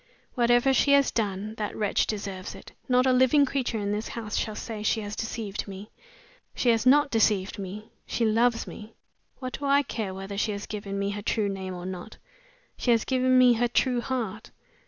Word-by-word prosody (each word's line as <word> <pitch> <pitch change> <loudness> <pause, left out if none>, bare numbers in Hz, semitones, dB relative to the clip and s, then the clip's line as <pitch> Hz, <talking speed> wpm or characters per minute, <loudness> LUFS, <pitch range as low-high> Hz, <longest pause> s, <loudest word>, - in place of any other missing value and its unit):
"Whatever 240 +2 +3
she 280 +1 +4
has 280 -1 +4
done, 210 -1 -2
that 210 - -3
wretch 210 -2 +1
deserves 195 -3 -5
it! - - -12 0.2
Not 250 0 +4
a 260 - +4
living 260 +3 +5
creature 255 -4 -2
in 205 -1 -2
this 210 +2 -2
house 220 -2 -5
shall 215 - -1
say 220 0 -6
she 220 +1 +1
has 205 0 -5
deceived 220 -3 -4
me. 200 +2 -9 0.6
She 245 - +1
has 230 +1 +2
not 290 +2 +5
deceived 210 -4 +1
me 200 +3 -7 0.2
she 235 - 0
loves 230 +2 +2
me! 215 +1 -10 0.4
What 255 -1 -6
do 285 - -4
I 280 +1 +4
care 210 -8 -4
whether 195 +1 -5
she 210 0 0
has 200 0 -5
given 200 -2 -5
me 200 0 -1
her 205 0 -5
true 205 0 0
name 190 -1 -5
or 175 0 -7
not! 185 +3 -7 0.6
She - - -2
has 230 -2 +4
given 255 0 +3
me 250 -1 +7
her 240 +1 +1
true 245 0 +1
heart. 230 -5 -4
220 Hz, 200 wpm, -27 LUFS, 200-250 Hz, 0.6 s, me